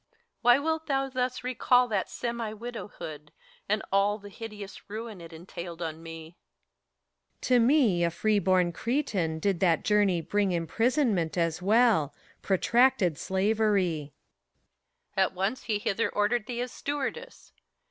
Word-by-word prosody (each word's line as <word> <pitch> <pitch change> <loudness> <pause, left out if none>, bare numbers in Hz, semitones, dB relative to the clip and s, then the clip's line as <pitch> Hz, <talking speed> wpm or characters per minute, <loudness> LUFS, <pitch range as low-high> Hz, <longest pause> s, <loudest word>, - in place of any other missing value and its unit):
HELENA. - - -40 0.2
Why 245 +1 +6
wilt 320 +2 -2
thou 270 -2 0
thus 255 -1 -2
recall 250 0 +3
that 205 -3 -1
semi 235 -2 -4
widowhood, 205 -10 -8 0.4
And 210 +1 +1
all 200 +1 +3
the 205 -1 -12
hideous 210 -2 -9
ruin 215 -2 -6
it 165 0 -11
entailed 170 0 -8
on 160 -1 -5
met 165 - -9
PHORKYAS. 165 0 -9 1.1
To 250 -1 +3
me, 235 - +4
a 170 - +3
free 210 +5 +1
born 185 -3 +2
Cretan, 210 - -1
did 190 +2 0
that 170 -4 +2
journey 205 -4 +3
bring 200 +3 0
Imprisonment, 185 - +1
as 165 0 0
well, 210 - +3
— - - -30
protracted 210 - +2
slavery. 190 -6 +1 1.0
HELENA. 190 -1 +4
At - - -13
once 195 +7 -1
he 215 -3 0
hither 205 +1 -1
ordered 210 +3 0
thee 240 -1 -3
as 250 0 -4
stewardess. 290 - -5
205 Hz, 145 wpm, -28 LUFS, 175-240 Hz, 1.1 s, Why